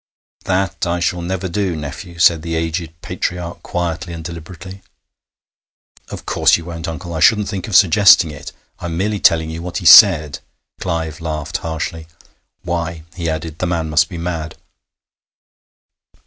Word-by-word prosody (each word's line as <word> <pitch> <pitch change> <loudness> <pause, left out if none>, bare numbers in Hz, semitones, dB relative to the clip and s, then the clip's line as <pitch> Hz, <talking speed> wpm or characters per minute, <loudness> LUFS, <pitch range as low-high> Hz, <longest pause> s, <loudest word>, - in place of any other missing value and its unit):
"' - - -35
'That 95 -1 -1
I 85 +1 -1
shall 85 0 -1
never 95 +2 -3
do, 95 -1 -2
nephew,' 75 +4 -8
said 85 -1 +4
the 85 0 -4
aged 80 0 -3
patriarch 90 -1 -4
quietly 85 0 -4
and 80 -1 -7
deliberately. 85 +3 -9 1.3
'Of - - -8
course - - +3
you 85 - -10
won't, 85 -1 -6
uncle. 80 +1 -6
I 80 - -3
shouldn't 105 +5 +4
think 95 -3 -5
of 105 - -3
suggesting 95 -2 +6
it. 75 - -9 0.3
I'm 85 -1 -4
merely 105 +2 -1
telling 80 -3 +3
you 80 +1 -6
what 90 0 -5
he 90 - -5
said.' 80 - +7 0.4
Clive 80 -3 -3
laughed 75 -2 -3
harshly. 80 0 -5 0.6
'Why,' 85 -2 -3
he 85 -2 -3
added, 80 0 -5
'the 90 - -1
man 80 -3 -2
must 80 0 +3
be 85 - -7
mad!' 85 -2 -4
85 Hz, 160 wpm, -18 LUFS, 80-90 Hz, 1.3 s, said